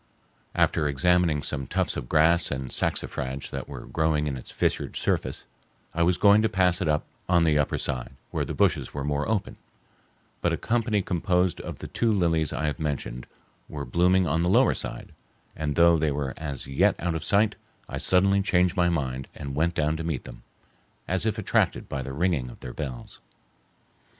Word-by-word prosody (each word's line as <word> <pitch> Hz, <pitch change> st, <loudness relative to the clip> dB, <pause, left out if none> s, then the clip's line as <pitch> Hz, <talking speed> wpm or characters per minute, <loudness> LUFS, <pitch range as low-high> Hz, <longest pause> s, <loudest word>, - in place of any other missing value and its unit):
After 75 Hz, -, +2 dB
examining 80 Hz, +1 st, +2 dB
some 70 Hz, -2 st, -3 dB
tufts 90 Hz, +1 st, -1 dB
of -, -, -5 dB
grass 80 Hz, +3 st, +4 dB
and 65 Hz, -2 st, -4 dB
saxifrage 65 Hz, +1 st, -2 dB
that -, -, -5 dB
were -, -, -8 dB
growing 80 Hz, -1 st, 0 dB
in 70 Hz, -2 st, -2 dB
its 65 Hz, -, -8 dB
fissured -, -, -1 dB
surface, -, -, -1 dB, 0.5 s
I 85 Hz, -, -1 dB
was 85 Hz, +1 st, +3 dB
going 100 Hz, +2 st, +6 dB
to 110 Hz, -, +2 dB
pass 90 Hz, -1 st, +2 dB
it 90 Hz, -, 0 dB
by 75 Hz, -1 st, +2 dB, 0.3 s
on 85 Hz, -2 st, +4 dB
the 75 Hz, -2 st, +3 dB
upper 75 Hz, -, 0 dB
side, 65 Hz, 0 st, -3 dB, 0.2 s
where -, -, -1 dB
the -, -, -5 dB
bushes -, -, +1 dB
were 70 Hz, -, -3 dB
more 75 Hz, +4 st, -1 dB
open, 110 Hz, -3 st, -1 dB, 0.8 s
but -, -, +1 dB
a -, -, 0 dB
company 110 Hz, -3 st, 0 dB
composed 90 Hz, 0 st, 0 dB
of -, -, -7 dB
the -, -, -7 dB
two 115 Hz, -1 st, 0 dB
lilies 85 Hz, -6 st, +1 dB
I 80 Hz, -, -2 dB
have 75 Hz, -, -2 dB
mentioned 70 Hz, -5 st, -4 dB, 0.4 s
were 70 Hz, -2 st, -5 dB
blooming 90 Hz, +1 st, +3 dB
on 80 Hz, +3 st, +1 dB
the 90 Hz, -, +1 dB
lower 95 Hz, -, +5 dB
side, -, -, -6 dB, 0.4 s
and 75 Hz, -2 st, -2 dB
though 85 Hz, -1 st, +5 dB
they 80 Hz, 0 st, +1 dB
were 70 Hz, -2 st, -2 dB
as 70 Hz, -4 st, -5 dB
yet 70 Hz, -, +2 dB
out 85 Hz, 0 st, -2 dB
of 80 Hz, -1 st, -3 dB
sight, 105 Hz, +4 st, +3 dB, 0.3 s
I -, -, -5 dB
suddenly 100 Hz, +2 st, +4 dB
changed 90 Hz, -2 st, +2 dB
my 90 Hz, -2 st, +3 dB
mind 65 Hz, -6 st, -2 dB
and 70 Hz, -1 st, -6 dB
went 80 Hz, +4 st, 0 dB
down 75 Hz, 0 st, +1 dB
to 80 Hz, -, -4 dB
meet 80 Hz, -5 st, -3 dB
them, -, -, -11 dB, 0.7 s
as 95 Hz, +4 st, 0 dB
if 110 Hz, 0 st, -1 dB
attracted 110 Hz, -, +1 dB
by 70 Hz, -, -3 dB
the 65 Hz, -, -6 dB
ringing 75 Hz, -5 st, 0 dB
of -, -, -13 dB
their 60 Hz, -, -7 dB
bells. 65 Hz, -6 st, -7 dB
80 Hz, 195 wpm, -26 LUFS, 70-90 Hz, 0.8 s, going